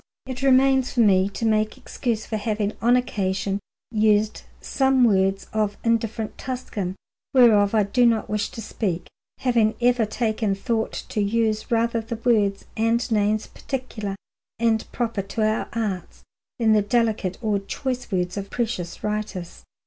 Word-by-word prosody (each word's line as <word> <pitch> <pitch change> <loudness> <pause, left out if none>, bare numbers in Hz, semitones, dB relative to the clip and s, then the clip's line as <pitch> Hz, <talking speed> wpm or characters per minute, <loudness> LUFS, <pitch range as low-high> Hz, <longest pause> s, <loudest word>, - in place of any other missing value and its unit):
It 260 -1 -6
remains 265 -1 +4
for 245 - +3
me 195 -3 +4
to 205 +3 -4
make 215 -1 +1
excuse 230 -5 -3
for 220 - -3
having 210 -1 -1
on 240 +2 +5
occasion 195 -5 -1 0.3
used 215 -1 +2 0.2
some 265 -1 +2
words 195 -3 +3
of 210 -2 0
indifferent 225 -1 -1
Tuscan, 215 -8 -4 0.4
whereof 220 -5 +6
I 215 - +4
do 240 +5 +3
not 225 -2 +1
wish 210 0 -1
to 225 - -8
speak, 185 -5 -2 0.4
having 230 -4 +2
ever 245 -2 +3
taken 220 -2 0
thought 220 +2 -1 0.2
to 210 - -1
use 215 +1 0
rather 230 0 +1
the 225 +1 -5
words 215 -4 +1
and 230 +1 +1
names 215 0 +2
particular 225 -7 -5 0.4
and 225 -1 +1
proper 230 -4 -1
to 215 +3 -1
our 215 0 -1
arts 205 -6 -4 0.3
than 225 -2 +3
the 210 - +4
delicate 210 -3 0
or 215 -3 0
choice 250 +5 -4
words 180 0 -1
of 200 0 -4
precious 225 -8 -3
writers. 210 -4 -4
220 Hz, 150 wpm, -24 LUFS, 205-235 Hz, 0.4 s, whereof